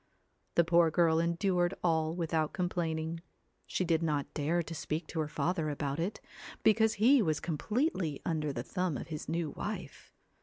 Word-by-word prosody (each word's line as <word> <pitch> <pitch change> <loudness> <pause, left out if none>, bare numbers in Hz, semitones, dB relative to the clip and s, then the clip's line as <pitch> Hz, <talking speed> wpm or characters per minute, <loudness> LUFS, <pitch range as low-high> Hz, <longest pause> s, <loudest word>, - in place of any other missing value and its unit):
The 170 - +6
poor 170 0 +4
girl 160 0 +3
endured 175 +1 +1
all 160 -2 +1
without 160 -3 0
complaining. 165 -2 -2 0.5
She 185 - -1
did 165 -1 +2
not 150 -3 -1
dare 165 +3 0
to 165 - -7
speak 155 +1 -3
to 165 - -3
her 155 - 0
father 160 +1 -1
about 145 0 -2
it, 185 +6 -2 0.4
because 220 0 +4
he 250 +5 +5
was 155 -6 +1
completely 180 - -1
under 155 -3 0
the 120 -3 -4
thumb 180 -1 -1
of - - -7
his 155 -1 -5
new 165 -1 -1
wife. - - -6
165 Hz, 165 wpm, -32 LUFS, 155-175 Hz, 0.5 s, The